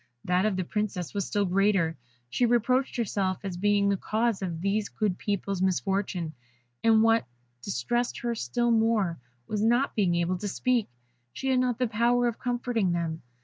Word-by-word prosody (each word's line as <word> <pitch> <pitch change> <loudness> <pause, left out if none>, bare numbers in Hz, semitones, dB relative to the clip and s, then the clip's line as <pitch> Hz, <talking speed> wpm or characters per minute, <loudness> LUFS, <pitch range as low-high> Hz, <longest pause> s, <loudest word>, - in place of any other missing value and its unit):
That 180 +3 +2
of 210 - 0
the 185 - -1
Princess 195 -3 -3
was 200 -3 -2
still 205 -1 +1
greater, 190 -3 +2 0.3
she 185 - +1
reproached 250 +3 +2
herself 195 -5 0
as 190 -3 -4
being 200 +2 +2
the 200 -1 +2
cause 220 +1 0
of 170 -4 -3
these 200 +2 0
good 205 -4 -1
peoples' 200 -2 -2
misfortune; 190 -3 0 0.5
and 225 -1 +5
what 225 - +3 0.3
distressed 240 - -1
her 240 0 -1
still 235 - 0
more 220 -6 +2 0.3
was, 210 -1 -2
not 240 +5 +2
being 190 -6 +2
able 175 +1 0
to 205 - -3
speak, 240 +2 0 0.4
she 270 - -3
had 260 -1 +3
not 250 -2 +1
the 250 - +1
power 240 +3 +2
of 235 - -3
comforting 240 -6 0
them. 165 -2 -2
205 Hz, 175 wpm, -27 LUFS, 185-235 Hz, 0.5 s, and